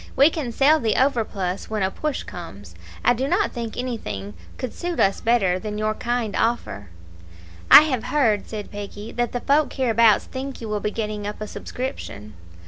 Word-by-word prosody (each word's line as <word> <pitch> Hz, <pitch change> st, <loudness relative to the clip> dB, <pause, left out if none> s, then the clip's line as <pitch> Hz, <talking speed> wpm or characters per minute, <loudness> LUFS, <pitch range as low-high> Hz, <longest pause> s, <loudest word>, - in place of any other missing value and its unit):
We 280 Hz, +4 st, +6 dB
can 290 Hz, -8 st, -3 dB
sell 290 Hz, +6 st, +4 dB
the 225 Hz, -5 st, +1 dB
overplus 215 Hz, -8 st, 0 dB
when 215 Hz, -2 st, -1 dB
a 190 Hz, -, 0 dB
push 305 Hz, +4 st, -3 dB
comes. 100 Hz, -, -10 dB, 0.3 s
I 245 Hz, -, +6 dB
do 260 Hz, +3 st, -2 dB
not 350 Hz, +5 st, +1 dB
think 230 Hz, -3 st, -5 dB
anything 215 Hz, -, -4 dB, 0.2 s
could 255 Hz, -, -5 dB
suit 350 Hz, -1 st, -4 dB
us 195 Hz, 0 st, +2 dB
better 200 Hz, -6 st, +2 dB
than 210 Hz, +1 st, -5 dB
your 215 Hz, 0 st, 0 dB
kind 235 Hz, -2 st, -2 dB
offer." 105 Hz, -, -1 dB, 0.8 s
"I -, -, +12 dB
have 260 Hz, -7 st, -1 dB
heard," 230 Hz, -9 st, +1 dB
said 210 Hz, -2 st, -7 dB
Peggy, 205 Hz, +1 st, -7 dB
"that 240 Hz, -1 st, -1 dB
the 245 Hz, -, -3 dB
folk 290 Hz, +2 st, +2 dB
hereabouts 230 Hz, -4 st, +4 dB
think 265 Hz, +1 st, -6 dB
you 225 Hz, -, -6 dB
will 210 Hz, 0 st, -1 dB
be 210 Hz, -, -1 dB
getting 210 Hz, -1 st, -4 dB
up 210 Hz, -, -6 dB
a 215 Hz, -, -4 dB
subscription." 210 Hz, -, -6 dB
225 Hz, 185 wpm, -23 LUFS, 205-255 Hz, 0.8 s, I